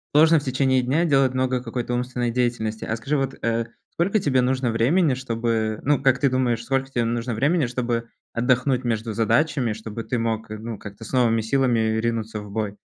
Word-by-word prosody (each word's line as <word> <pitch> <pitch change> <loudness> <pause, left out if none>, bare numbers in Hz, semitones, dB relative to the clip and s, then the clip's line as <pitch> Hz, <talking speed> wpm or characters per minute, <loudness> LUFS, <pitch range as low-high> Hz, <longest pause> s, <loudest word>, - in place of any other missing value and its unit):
сложно 160 +1 +6
в 140 - -10
течение 130 0 +2
дня 145 +7 +1
делать 135 -5 +3
много 130 -1 0
какой-то 120 0 -4
умственной 125 -1 -1
деятельности. 115 -3 -1
А 110 - -1
скажи, 135 +7 -1
вот, 135 -1 -1
э, 115 0 0 0.3
сколько 195 +6 +1
тебе 130 -7 +2
нужно 130 -1 +1
времени, 135 +8 +3
чтобы, 115 -3 -1
ну, 145 -1 +2
как 135 -1 +3
ты 140 - +3
думаешь, 125 -3 0
сколько 135 +2 -1
тебе 120 -3 0
нужно 115 +1 -2
времени 145 +6 +2
чтобы 120 -1 -2 0.2
отдохнуть 125 +2 +1
между 115 -1 -1
задачами, 120 +2 +1
чтобы 110 +1 -7
ты 125 - -1
мог, 115 -1 -2
э, 110 - -5
ну, 110 0 -6
как-то 105 +2 -10
с - - -8
новыми 115 -3 +3
силами 125 +1 +1 0.2
ринуться 110 -1 -2
в 105 0 -9
бой? 105 -1 -3
120 Hz, 195 wpm, -23 LUFS, 115-130 Hz, 0.3 s, сложно